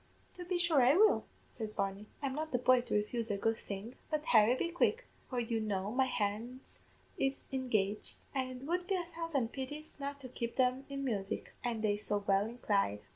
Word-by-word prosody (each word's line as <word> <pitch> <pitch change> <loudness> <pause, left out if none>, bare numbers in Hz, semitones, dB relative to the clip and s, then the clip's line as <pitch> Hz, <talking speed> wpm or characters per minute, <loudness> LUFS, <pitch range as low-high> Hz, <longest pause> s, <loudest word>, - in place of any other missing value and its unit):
"'To 355 - -8
be 360 0 0
sure 340 -5 +4
I 255 +4 +6
will,' 430 +2 +5 0.3
says 215 -2 -5
Barney. 195 +1 -2 0.2
'I'm 270 -1 0
not 310 +2 -3
the 250 - +2
boy 250 0 +5
to 240 - -2
refuse 225 +2 0
a 205 - 0
good 225 +3 +1
thing; 200 +4 -6 0.2
but, 305 -1 -1
Harry, 220 +1 +6
be 335 - -1
quick, 450 +8 +1 0.2
for 250 - -1
you 230 -1 0
know 205 -2 -1
my 260 +2 +3
hands 240 +2 -3 0.4
is 270 0 0
engaged, 215 -6 0 0.2
an' 265 -2 0
it 255 0 -8
would 355 +3 -1
be 390 - +2
a 355 -2 -1
thousand 305 -8 -1
pities 290 +3 -6
not 280 0 -4
to 260 - -5
keep 235 -1 -4
them 255 +1 +2
in 275 0 -3
music, 200 -6 -2
an' 235 -3 -1
they 205 -1 +2
so 205 -1 -1
well 200 +1 +3
inclined. 200 - 0
250 Hz, 205 wpm, -34 LUFS, 215-280 Hz, 0.4 s, I